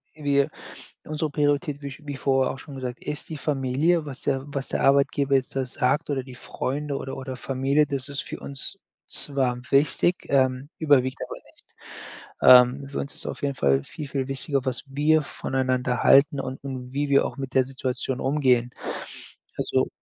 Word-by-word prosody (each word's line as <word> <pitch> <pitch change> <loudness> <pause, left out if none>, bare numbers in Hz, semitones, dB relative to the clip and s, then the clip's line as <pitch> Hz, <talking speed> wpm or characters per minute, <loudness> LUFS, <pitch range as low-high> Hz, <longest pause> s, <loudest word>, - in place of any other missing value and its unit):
irgendwie 140 -2 +2 0.6
unsere 155 0 -2
Priorität, 145 0 0
wie 140 - -5
ich 140 +2 -10
wie 145 - -3
vorher 135 -1 +1
auch 135 - -10
schon 145 - -10
gesagt, 125 -2 -6
ist 150 - -5
die 155 - -5
Familie. 145 +4 +1
Was 135 -3 -8
der 135 0 0
was 140 -2 -4
der - - -1
Arbeitgeber 140 0 +3
jetzt 130 0 0
da 135 -1 0
sagt 135 +5 0
oder 135 -3 -1
die 130 -1 -11
Freunde 140 +3 -3
oder 135 - -6
oder 130 -1 -5
Familie, 135 +3 +1
das 135 -1 -3
ist 140 - -2
für - - -7
uns 140 +7 -5 0.3
zwar 135 -4 -1
wichtig, 150 +5 +3
ähm, 130 0 +2
überwiegt 130 -4 +3
aber - - -7 0.2
nicht. - - -24 0.7
Ähm, 125 +2 +7
für 140 - -4
uns 140 - -4
ist - - -7
auf - - -5
jeden 140 -1 0
Fall 70 - +2
viel, 150 -2 -8
viel 135 -1 -2
wichtiger, 135 0 -2
was 130 -2 -1
wir 150 +3 +3
voneinander 130 -3 -1
halten 140 +1 +6
und 130 0 -5
und 130 -2 -6
wie 145 0 -1
wir 140 - +4
auch - - -5
mit 135 -1 -5
der 130 -1 +4
Situation 130 0 -3
umgehen. 130 -4 +2 0.9
Also, - - +1
135 Hz, 185 wpm, -25 LUFS, 130-145 Hz, 0.9 s, Ähm